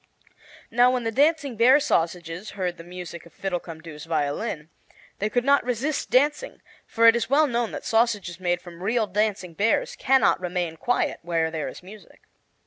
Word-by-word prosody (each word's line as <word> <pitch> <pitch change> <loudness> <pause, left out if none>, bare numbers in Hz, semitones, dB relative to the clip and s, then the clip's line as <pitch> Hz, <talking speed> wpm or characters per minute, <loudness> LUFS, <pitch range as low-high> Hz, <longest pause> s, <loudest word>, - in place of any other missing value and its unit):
Now 245 +2 +5
when 250 -1 0
the 225 - -1
dancing 285 +1 +2
bear 250 +6 +6
sausages 175 - -1
heard 180 -2 -2
the 165 - -10
music 175 -1 -9
of - - -21
Fiddlecumdoo's 165 -5 -6
violin, 155 +2 -2 0.5
they 210 - 0
could 245 +3 0
not 280 0 +4
resist 250 +5 -2
dancing; 295 - +1 0.3
for 230 - +2
it 230 0 +8
is 235 0 -1
well 295 +3 +4
known 240 -4 -1
that - - -6
sausages 225 -7 0
made 175 -1 -1
from 175 -1 -12
real 220 +3 +1
dancing 205 -3 -1
bears 210 +6 0
can 265 0 +3
not - - +3
remain 175 -2 -2
quiet 240 +10 -1
where 165 -1 -1
there 160 -2 -3
is - - -9
music. 205 +3 -14
205 Hz, 175 wpm, -24 LUFS, 170-245 Hz, 0.5 s, it